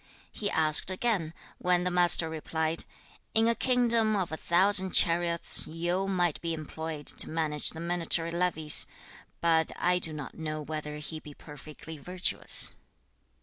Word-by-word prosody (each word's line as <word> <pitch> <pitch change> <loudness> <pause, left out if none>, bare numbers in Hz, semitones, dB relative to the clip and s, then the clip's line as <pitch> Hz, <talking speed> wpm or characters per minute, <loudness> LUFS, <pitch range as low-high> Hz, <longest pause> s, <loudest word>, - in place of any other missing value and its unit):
2. - - -12
He 205 - -1
asked 155 0 +5
again, 185 -4 -2 0.3
when 180 0 0
the 180 - -2
Master 175 -2 +3
replied, 160 0 -4 0.5
'In 225 +1 +3
a 235 - +3
kingdom 235 -3 0
of 185 -5 -3
a - - -3
thousand 190 +3 +1
chariots, 170 0 +4
Yu 175 +4 -3
might 175 -4 -1
be 165 -1 -3
employed 155 -1 -8
to - - +1
manage 155 -2 -1
the 160 - -5
military 170 -1 -2
levies, 170 -3 0 0.5
but 165 -1 +1
I 180 +1 0
do 160 - 0
not 145 -4 -8
know 155 -1 -6
whether 150 0 -7
he 155 +1 -6
be 150 -2 -14
perfectly 155 +1 -12
virtuous.' 180 +5 +3
165 Hz, 150 wpm, -27 LUFS, 155-180 Hz, 0.5 s, asked